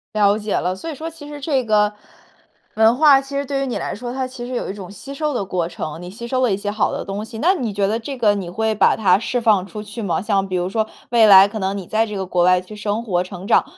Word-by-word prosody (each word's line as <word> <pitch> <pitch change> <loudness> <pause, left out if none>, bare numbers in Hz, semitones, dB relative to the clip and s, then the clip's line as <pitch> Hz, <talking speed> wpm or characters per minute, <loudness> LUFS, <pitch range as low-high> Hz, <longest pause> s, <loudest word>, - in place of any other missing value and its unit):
了 205 -1 +4
解 215 -1 -2
了， 180 +1 -1
所 260 +13 -7
以 310 - -5
说 320 +4 -5
其 320 -3 -12
实 295 0 -8
这 275 -2 0
个 210 -2 +2 0.8
文 225 +2 +5
化 285 -2 +6
其 275 +1 -9
实 280 - -1
对 275 0 -2
于 - - -3
你 250 - -2
来 - - -4
说， 240 +3 -6
它 260 +1 -2
其 255 -1 -8
实 255 - -5
有 - - -3
一 - - -3
种 195 -3 -9
吸 265 +7 -9
收 300 +1 -2
的 205 - -1
过 180 -3 -2
程， 160 -2 -6
你 180 - -8
吸 235 +5 -8
收 255 +1 0
了 250 -4 +2
一 190 - +1
些 205 0 -3
好 215 - 0
的 - - -4
东 200 +2 -4
西， 225 +1 -9
那 340 +11 +3
你 250 - -3
觉 200 0 0
得 215 +3 0
这 270 +4 -6
个 215 -4 +3
你 195 -4 -4
会 220 +4 -1
把 215 - +3
它 190 -4 +3
释 245 +2 -1
放 215 -5 +3
出 210 +1 -7
去 215 +2 -8
吗？ 175 -6 -1
像 195 -1 0
比 185 - -3
如 180 0 0
说 220 +3 -1 0.2
未 230 -2 +6
来 195 -1 +9
可 215 +2 -6
能 195 +1 -1
你 190 - -6
在 220 +5 0
这 210 - -6
个 190 -1 -3
国 180 -1 +1
外 180 0 +5
去 185 +4 -11
生 210 +2 -2
活、 180 -6 0
成 185 0 -9
长， - - +4
215 Hz, 320 characters per minute, -20 LUFS, 195-245 Hz, 0.8 s, 来